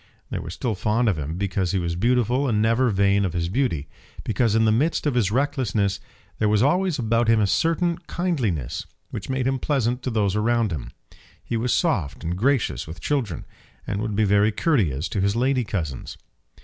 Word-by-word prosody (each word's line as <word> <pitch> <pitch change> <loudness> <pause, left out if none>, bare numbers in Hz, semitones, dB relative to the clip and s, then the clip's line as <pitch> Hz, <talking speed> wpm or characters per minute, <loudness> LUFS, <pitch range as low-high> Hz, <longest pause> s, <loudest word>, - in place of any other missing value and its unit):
They - - -2
were - - -7
still 120 -3 -2
fond 110 +4 +1
of 95 -8 +1
him 75 +4 -4
because 95 -2 -1
he - - +2
was 85 -2 -1
beautiful 125 +6 +2
and 105 -2 +1
never 115 +4 +3
vain 100 0 +2
of 90 -4 -1
his 85 -1 -1
beauty; 90 - -1 0.4
because 110 0 +1
in 115 0 +4
the 110 - +4
midst 145 +11 +1
of 145 - +1
his 115 -6 +2
recklessness 110 -6 0 0.4
there 105 - +2
was 105 +1 +3
always 180 +3 +2
about 115 -1 +1
him 115 -1 +4
a 105 - +3
certain 165 - +1
kindliness 120 - -2 0.2
which - - -6
made 130 -1 -1
him 135 0 0
pleasant 125 -4 0
to 130 - -2
those 105 -4 0
around 115 0 +1
him. 75 -7 -4 0.5
He - - -3
was 115 +2 0
soft 95 - 0
and 85 +2 -2
gracious 130 +5 0
with 80 +3 -8
children, 120 - -2 0.4
and 100 - -2
would 110 -2 -2
be 110 - +2
very 105 +1 +3
courteous 100 - +1
to 100 - -1
his 100 +2 +1
lady 130 +1 +2
cousins. 80 - -4
110 Hz, 200 wpm, -24 LUFS, 100-130 Hz, 0.5 s, in